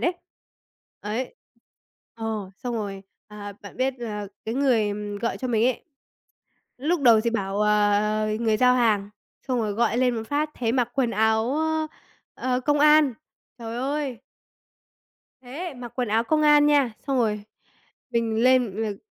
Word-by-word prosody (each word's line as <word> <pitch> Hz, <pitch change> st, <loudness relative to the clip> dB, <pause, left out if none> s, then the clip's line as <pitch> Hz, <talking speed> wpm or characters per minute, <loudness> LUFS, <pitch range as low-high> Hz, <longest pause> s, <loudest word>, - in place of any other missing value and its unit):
đấy. 350 Hz, -, +1 dB, 0.9 s
Ấy. 220 Hz, +5 st, -4 dB, 0.8 s
Ờ, 220 Hz, -4 st, -4 dB
xong 245 Hz, -2 st, -4 dB
rồi, 200 Hz, -3 st, -4 dB, 0.3 s
à, 205 Hz, -1 st, -8 dB
bạn 200 Hz, -, -11 dB
biết 260 Hz, +1 st, 0 dB
là 210 Hz, -3 st, -5 dB, 0.2 s
cái 225 Hz, -, -3 dB
người, 250 Hz, -6 st, +2 dB
ừm, 205 Hz, 0 st, -4 dB
gọi 235 Hz, +2 st, -2 dB
cho 255 Hz, -, -4 dB
mình 225 Hz, -1 st, +2 dB
ấy, 255 Hz, -, -1 dB, 0.9 s
lúc 315 Hz, +5 st, 0 dB
đầu 235 Hz, -5 st, +6 dB
thì 235 Hz, +1 st, 0 dB
bảo, 200 Hz, -3 st, -2 dB
ờ, 210 Hz, 0 st, +2 dB
người 220 Hz, -2 st, +2 dB
giao 250 Hz, +2 st, +4 dB
hàng, 215 Hz, -5 st, +2 dB, 0.4 s
xong 255 Hz, -, +1 dB
rồi 215 Hz, -3 st, -1 dB
gọi 235 Hz, +2 st, +1 dB
lên 250 Hz, -1 st, +2 dB
một 225 Hz, -, -3 dB
phát 300 Hz, +1 st, 0 dB
thấy 230 Hz, -2 st, -1 dB
mặc 245 Hz, -2 st, +1 dB
quần 260 Hz, -4 st, +1 dB
áo 220 Hz, +2 st, +2 dB
á, 315 Hz, 0 st, 0 dB, 0.5 s
ơ, 255 Hz, -, -2 dB
ờ, 250 Hz, -, +1 dB
công 290 Hz, +3 st, +1 dB
an, 300 Hz, -3 st, +5 dB, 0.4 s
trời 230 Hz, 0 st, -6 dB
ơi. 270 Hz, -1 st, -2 dB, 1.2 s
Thế, 285 Hz, +6 st, -6 dB
mặc 245 Hz, -2 st, -9 dB
quần 250 Hz, -3 st, -1 dB
áo 225 Hz, +2 st, +2 dB
công 310 Hz, +3 st, +1 dB
an 295 Hz, -1 st, +6 dB
nha, 285 Hz, -5 st, +3 dB
xong 270 Hz, -2 st, +1 dB
rồi 210 Hz, -3 st, 0 dB, 0.7 s
mình 230 Hz, -2 st, 0 dB
lên 250 Hz, -6 st, +3 dB
l 210 Hz, -3 st, -4 dB
235 Hz, 165 wpm, -25 LUFS, 215-260 Hz, 1.2 s, đầu